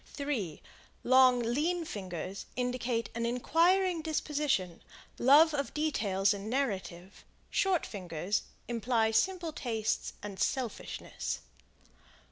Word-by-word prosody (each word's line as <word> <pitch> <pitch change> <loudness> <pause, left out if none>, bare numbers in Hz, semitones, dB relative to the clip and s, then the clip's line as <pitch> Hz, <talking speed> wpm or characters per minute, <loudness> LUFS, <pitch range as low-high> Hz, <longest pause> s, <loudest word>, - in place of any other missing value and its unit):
3 250 - -4 0.4
Long, 255 0 +6
lean 320 +9 0
fingers 190 - -6
indicate 245 -2 -1
an 235 - -3
inquiring 335 +9 +2
disposition; 295 - -1 0.4
love 300 +5 +7
of 280 -1 -2
details 210 -10 +1
in 200 +1 -6
narrative; 195 -8 -3 0.3
short 380 -4 +2
fingers 180 0 -2 0.3
imply 230 -1 +1
simple 335 +8 +1
tastes 225 -5 -2
and 200 -2 -7
selfishness. 255 -5 -3
245 Hz, 95 wpm, -31 LUFS, 200-300 Hz, 0.4 s, love